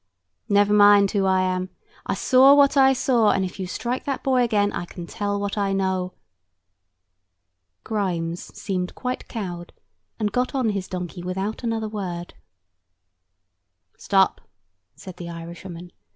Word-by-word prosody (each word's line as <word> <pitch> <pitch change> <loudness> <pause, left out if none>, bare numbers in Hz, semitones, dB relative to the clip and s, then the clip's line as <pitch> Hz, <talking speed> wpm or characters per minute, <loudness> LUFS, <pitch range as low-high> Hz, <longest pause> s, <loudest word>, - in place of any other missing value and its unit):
"Never 205 0 +4
mind 205 -1 +6
who 195 -2 +1
I 190 0 +3
am. 185 0 -1 0.4
I - - 0
saw 265 +2 +6
what 285 0 +5
I 270 -1 +6
saw; 245 -4 +2
and 190 - +2
if 185 - -8
you 185 - -3
strike 245 +7 -3
that 275 -2 -3
boy 260 -2 +2
again, 205 -4 +2
I 175 - -3
can 175 0 -9
tell 205 +3 -3
what 200 +1 -3
I 200 -1 0
know." 190 -1 -1 1.7
Grimes 175 -5 -2 0.2
seemed 185 -2 -3
quite 250 0 -4
cowed, 175 -6 -6 0.4
and 210 -2 -1
got 250 +4 -1
on 255 -4 +1
his 195 -3 -3
donkey 180 -1 -6
without 190 +6 -4
another 225 -2 -1
word. 180 -5 -5 1.6
"Stop!" - - +2 0.5
said 185 -2 -11
the 170 -1 -7
Irishwoman. 170 +1 -9
200 Hz, 145 wpm, -23 LUFS, 180-225 Hz, 1.7 s, mind